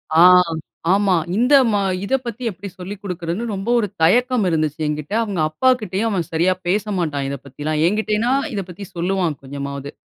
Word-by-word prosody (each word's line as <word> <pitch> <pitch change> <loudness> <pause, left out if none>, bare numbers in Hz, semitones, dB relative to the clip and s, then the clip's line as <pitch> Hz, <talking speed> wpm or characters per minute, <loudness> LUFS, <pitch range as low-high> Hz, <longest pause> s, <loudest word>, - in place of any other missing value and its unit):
ஆ, - - +6 0.7
ஆமா. 195 -1 +3 0.2
இந்த 250 +5 +3 0.2
மா 205 -1 +1 0.2
இத 265 - +1
பத்தி 235 +1 -6
எப்டி 195 +2 -9
சொல்லிக் 190 +2 -7
குடுக்குறதுன்னு 180 +2 -3
ரொம்ப 195 +3 -4
ஒரு 210 - 0
தயக்கம் 245 +6 +3
இருந்துச்சு 155 -2 -1
என்கிட்ட. 150 +4 -4
அவங்க 200 -6 -3
அப்பா 260 +12 +2
கிட்டேயும் 210 +2 -1
அவன் 175 -6 -1
சரியா 170 +3 +2
பேசமாட்டான் 180 -8 -1
இத 140 - -4
பத்திலாம். 150 +3 -3
என்கிட்டேனா 215 +4 0 0.2
இத 200 -2 -2
பத்தி 180 +3 -8
சொல்லுவான் 175 -3 -1
கொஞ்சமாவது. 140 +1 -6
185 Hz, 160 wpm, -20 LUFS, 155-210 Hz, 0.7 s, ஆ